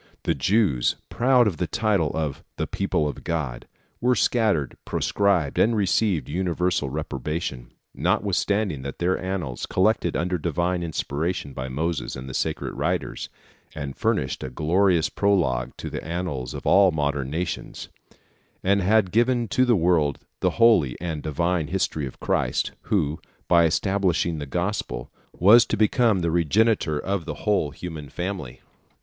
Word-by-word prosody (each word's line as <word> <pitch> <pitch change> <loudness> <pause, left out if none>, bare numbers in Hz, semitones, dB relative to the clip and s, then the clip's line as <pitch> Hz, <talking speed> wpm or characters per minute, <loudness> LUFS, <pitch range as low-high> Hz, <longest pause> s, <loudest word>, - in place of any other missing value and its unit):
The - - +1
Jews, 90 - +2
proud 125 0 +4
of 95 -7 -1
the 90 - -1
title 100 -3 +1
of 75 -4 -3
"the - - -1
People 75 - -1
of 70 - -6
God," 75 -8 -3 0.3
were 125 +1 +3
scattered, 105 - +1
proscribed, 95 -8 +1
and 115 +1 +4
received 100 -3 +1
universal 90 -2 0
reprobation 75 -2 -4
(Fig. - - -30 0.3
357), - - -6
notwithstanding 100 -5 +1
that 70 +1 -6
their 90 +1 0
annals, 90 -9 -3
collected - - +1
under 90 +1 -1
divine 85 +2 -1
inspiration 80 -2 -3
by 65 0 -5
Moses 80 +2 -2
and 65 0 -7
the 65 - -7
sacred - - -2
writers, - - -2 0.5
had 70 -3 -5
furnished - - -1
a 65 - -4
glorious 85 +4 +2
prologue 65 -12 0
to - - -6
the - - -5
annals 80 -7 -4
of - - -7
all 95 0 +6
modern 70 -4 -1
nations, 80 +3 -4 0.7
and 100 +1 +3
had 100 0 +3
given 120 +1 +2
to 130 - +3
the 120 -2 +4
world 80 -6 +2 0.2
the - - +2
holy 110 - +4
and 80 -3 -4
divine 85 +2 -1
history 80 -5 -1
of 65 - -11
Christ, - - 0
who, 80 -5 0 0.3
by 85 -1 +5
establishing 85 -1 +1
the 75 - -5
Gospel, 90 - -3 0.2
was 110 +6 +6
to 110 - -1
become 110 -1 +3
the 85 -1 0
regenerator 85 0 +2
of 95 +1 -2
the 75 -2 -4
whole 105 -8 +2
human 80 -3 -8
family. 90 -8 -5
85 Hz, 155 wpm, -24 LUFS, 75-100 Hz, 0.7 s, all